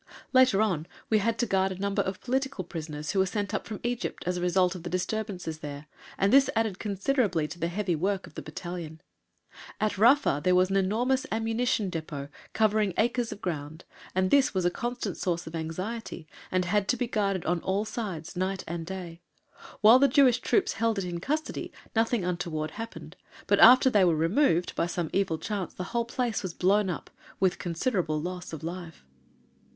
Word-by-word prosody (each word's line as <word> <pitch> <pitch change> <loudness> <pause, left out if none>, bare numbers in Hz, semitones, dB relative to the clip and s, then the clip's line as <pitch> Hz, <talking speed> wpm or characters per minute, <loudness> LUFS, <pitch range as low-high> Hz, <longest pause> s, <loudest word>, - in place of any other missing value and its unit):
Later 255 -6 +5
on 170 -7 -1 0.2
we 215 - +5
had 230 +2 0
to 240 - +1
guard 190 -2 +1
a 185 - -5
number 200 +1 0
of 190 0 -4
political 265 -4 -1
prisoners 155 -3 -5
who 195 - 0
were 190 - +3
sent 205 0 -3
up - - -2
from 215 -3 -6
Egypt 240 0 -3
as 180 +1 0
a 175 - -3
result 180 0 +2
of 180 - -8
the 175 - -5
disturbances 185 -3 -3
there, 145 -1 -7 0.3
and 195 +3 +2
this 275 0 +6
added 220 -4 0
considerably 200 - 0
to 175 - -9
the 165 - 0
heavy 180 0 -1
work 190 +4 -1
of - - -15
the - - -6
battalion. 170 -3 -7 0.8
At 210 -2 0
Rafa 235 - +4
there 180 0 +4
was 185 +1 +3
an - - +1
enormous 235 +7 +1
Ammunition 225 -2 0
Depôt, 150 -4 -5 0.2
covering 215 -3 +2
acres 240 +1 +1
of - - -9
ground, 155 -2 -4 0.3
and 185 0 +1
this 275 -6 +4
was 185 -2 +1
a 175 - +3
constant 240 +5 -3
source 175 -2 -1
of 160 - -9
anxiety, 175 +3 -5 0.2
and 185 -1 +1
had 200 +2 +1
to 250 - +1
be 245 - 0
guarded 200 -5 -1
on 175 0 0
all 195 +3 0
sides, 195 -9 -5
night 185 +1 -2
and 165 0 -4
day. 175 -3 -7 0.6
While 225 +4 +8
the 280 - +6
Jewish 265 -4 +5
troops 390 - +1
held 225 -1 0
it 195 - -1
in 175 -1 -4
custody 305 - -3 0.2
nothing 225 -3 +1
untoward 160 -3 -2
happened, 225 +6 -8 0.3
but, - - +3
after 255 +3 +9
they 205 -4 +5
were 170 -3 +4
removed, 175 - +2
by - - +1
some 170 -2 -3
evil 190 -5 +1
chance 200 0 -4
the 180 - -4
whole 235 -1 +1
place 235 -2 -1
was 185 -4 -5
blown 195 +2 +3
up 175 - -5 0.3
with 190 -2 +2
considerable 170 -3 -1
loss 180 +3 -5
of 160 -1 -7
life. 170 - -7
190 Hz, 195 wpm, -28 LUFS, 175-225 Hz, 0.8 s, after